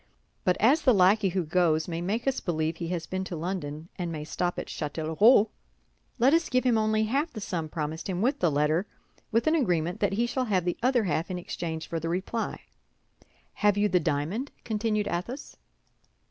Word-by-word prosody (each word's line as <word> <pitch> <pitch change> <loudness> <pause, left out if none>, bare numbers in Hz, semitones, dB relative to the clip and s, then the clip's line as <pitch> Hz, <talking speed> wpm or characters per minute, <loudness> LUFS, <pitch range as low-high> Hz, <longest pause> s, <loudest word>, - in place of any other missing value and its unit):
But 180 - +2
as 270 +9 +4
the 255 -6 +4
lackey 195 +2 +4
who 180 -1 -1
goes 160 -1 +2
may 170 -1 -3
make 205 +7 -2
us 270 - +1
believe 160 -1 -1
he 170 - -4
has 170 -2 -3
been 190 0 -3
to 180 - -5
London 160 -2 -4
and 175 -2 -2
may 155 -2 -4
stop 175 +3 -2
at - - -3
Châtellerault, 165 - +3 0.7
let 260 +4 +4
us 330 0 +2
give 255 0 +2
him 250 -3 +3
only 215 0 +2
half 280 +9 0
the 220 - -7
sum 170 -6 -3
promised 155 +2 -4
him, 180 -2 -2
with 250 +8 +1
the 175 - +3
letter, 155 +6 +1 0.4
with 230 +1 +2
an 315 - +3
agreement 180 - +1
that 200 -1 +1
he 230 +4 +1
shall 255 +2 -1
have 190 -6 +1
the 175 - 0
other 250 -1 +3
half 165 -2 -1
in 185 - -3
exchange 165 -2 -4
for 165 - -3
the 165 +1 -3
reply. 190 +6 -3 0.9
Have 205 -1 +2
you 205 +1 +3
the 185 -2 +3
diamond?" 165 - -1
continued 215 -1 -1
Athos. 235 - -5
185 Hz, 200 wpm, -28 LUFS, 165-225 Hz, 0.9 s, as